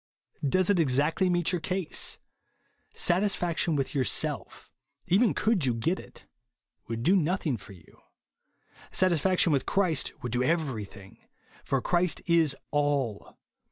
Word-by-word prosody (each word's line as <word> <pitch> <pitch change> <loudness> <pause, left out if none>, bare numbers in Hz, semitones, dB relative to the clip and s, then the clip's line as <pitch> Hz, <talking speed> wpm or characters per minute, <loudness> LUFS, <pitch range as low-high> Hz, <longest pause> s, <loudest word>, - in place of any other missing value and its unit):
Does 185 +7 +2
it 190 - +2
exactly 150 +5 +2
meet 175 -1 +1
your 180 -3 -2
case. 185 +1 -2 0.7
Satisfaction 175 -3 +1
with 135 -2 -2
yourself, 130 -6 -2 0.3
even 205 +7 +3
could 215 -6 +1
you 125 -3 +1
get 165 +11 -1
it, - - -12 0.6
would 115 0 -4
do 185 +9 +4
nothing 175 -5 0
for 100 -2 -12
you. 85 -4 -19 0.9
Satisfaction 185 -1 +2
v/ith 135 - 0
Christ 180 -7 +1
would 120 - -3
do 120 +2 0
everything; 120 - -3 0.4
for 135 -2 -1
Christ 175 -1 +1
is 165 -5 +3 0.2
ALL. 145 -7 -1
160 Hz, 125 wpm, -28 LUFS, 130-180 Hz, 0.9 s, do